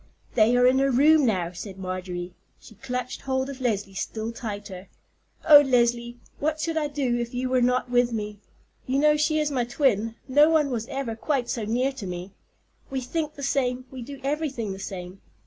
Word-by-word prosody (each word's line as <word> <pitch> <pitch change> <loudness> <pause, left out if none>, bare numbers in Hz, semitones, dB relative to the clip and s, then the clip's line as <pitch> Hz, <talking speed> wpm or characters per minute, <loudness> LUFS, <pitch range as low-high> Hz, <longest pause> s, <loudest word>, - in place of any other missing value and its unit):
"They 230 +2 +4
are 245 - +5
in 255 +1 +5
her 275 0 +3
room 290 +2 +5
now," 180 -6 0
said 190 +2 -8
Marjorie. 185 -1 -5 0.3
She - - -15
clutched 250 +2 -5
hold 265 0 -1
of 265 -1 -10
Leslie 205 -5 -1
still 220 +3 -4
tighter. 205 -5 -7 0.6
"Oh, 295 -2 +10
Leslie, 240 -2 +1 0.2
what 310 +1 -1
should 330 +1 -2
I 310 -2 0
do 270 -5 -1
if 235 +1 -4
you 255 +1 -1
were 255 -1 +2
not 250 0 +1
with 245 0 +3
me? 210 -2 -4 0.5
You 260 +1 +1
know 300 +1 +4
she 305 +1 +1
is 300 -1 0
my 255 -3 +1
twin; 235 -3 +1
no 290 +4 +5
one 305 -4 +2
was 230 -2 -3
ever 265 -5 -3
quite 255 +1 -1
so 230 -5 -2
near 250 +5 +1
to 265 -8 -7
me. 180 +2 -6 0.6
We 270 - -2
think 300 +4 -3
the 280 - -8
same, 255 -2 0
we 260 -1 -7
do 275 +3 -8
everything 275 -7 -2
the 190 - -9
same. 190 -1 -7
250 Hz, 200 wpm, -25 LUFS, 220-275 Hz, 0.6 s, Oh